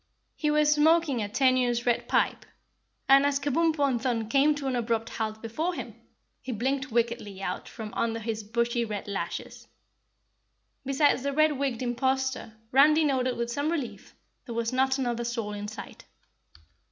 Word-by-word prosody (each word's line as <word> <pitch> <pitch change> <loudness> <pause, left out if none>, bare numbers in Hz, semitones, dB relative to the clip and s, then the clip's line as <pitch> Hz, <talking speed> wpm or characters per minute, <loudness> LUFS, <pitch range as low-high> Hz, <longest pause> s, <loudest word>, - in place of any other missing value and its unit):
He 300 - -1
was 300 0 +4
smoking 300 -4 +3
a 205 - -3
tenuous 250 0 +2
red 240 -1 +1
pipe, - - +1 0.6
and, 275 +1 +7
as 285 -1 +1
Kabumpo 290 +1 +1
and 245 -4 -1
Thun 235 -4 -1
came 285 +4 +4
to 290 -1 -6
an 265 -1 0
abrupt 230 -1 -1
halt 220 0 -4
before 315 +11 -2
him, - - -6 0.5
he 255 - -5
blinked 265 +4 -2
wickedly 230 -4 -1
out 185 -1 -4
from 220 -2 -8
under 230 -1 -1
his 220 -1 -4
bushy 235 +2 0
red 210 -3 -5
lashes. 200 -1 -5 1.2
Besides 275 0 +2
the 280 +1 -2
red 310 +1 +4
wigged 270 -4 -2
imposter 260 -1 -1
Randy 300 +4 +5
noted 255 -3 +1
with 235 0 -2
some 285 +5 -1
relief, 290 -8 -5 0.3
there 235 - -5
was 230 +1 -1
not 265 +1 +2
another 240 -3 -1
soul 230 -3 -3
in 205 0 -5
sight. 210 -1 -9
255 Hz, 165 wpm, -27 LUFS, 230-280 Hz, 1.2 s, and